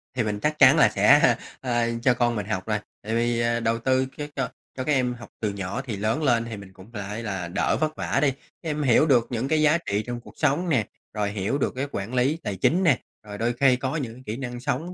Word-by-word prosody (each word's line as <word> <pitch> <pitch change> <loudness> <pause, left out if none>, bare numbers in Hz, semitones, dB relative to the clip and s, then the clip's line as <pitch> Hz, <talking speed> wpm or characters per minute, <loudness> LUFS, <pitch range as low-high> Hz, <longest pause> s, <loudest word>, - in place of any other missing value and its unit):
thì 125 - +1
mình 105 -1 -2
chắc 150 +5 -1
chắn 135 +2 +8
là 150 - +6
sẽ, 135 -3 +5 0.3
a, 120 -2 0 0.2
cho 125 - +5
con 120 -1 +1
mình 105 -3 -3
học 95 -2 -3
rồi, 105 -1 0 0.2
tại 110 +2 -2
vì 120 0 +1 0.2
đầu 115 0 +1
tư 130 +2 +2
các 150 -1 -5
cho 135 -4 -1 0.3
cho 130 - -2
các 150 - -1
em 125 -2 +1
học 120 0 -11
từ 110 - 0
nhỏ 100 +5 -4
thì 110 -6 -4
lớn 110 +9 -1
lên 120 -5 +2
thì 115 -2 -6
mình 100 -1 -12
cũng 95 +4 -15
phải 105 +1 -5
là 95 -5 -3
đỡ 85 - 0
vất 155 0 -1
vả - - -1
đi, 140 -2 +3
các 140 +4 -11
em 150 0 -1
hiểu 130 +2 +5
được 125 -6 +3
những 120 +1 -2
cái 155 +1 +2
giá 155 +2 +5
trị 105 -11 -2
trong 120 0 -4
cuộc - - -16
sống 155 +4 +1
nè, 125 -9 +1 0.3
rồi 105 -1 -1
hiểu 100 +6 -1
được 145 - -1
cái 135 +3 -2
quản 100 +5 -4
lý 130 +5 +2
tài 100 - -3
chính 170 - +2
nè, 160 -8 +4 0.2
rồi 105 -1 -8
đôi 115 +3 0
khi 130 +1 +4
có 130 +3 -3
những 130 -8 -3
cái 130 +2 -14
kỹ 110 +2 -4
năng 125 -2 -5
sống 155 +8 -3
120 Hz, 265 wpm, -25 LUFS, 110-140 Hz, 0.3 s, chắn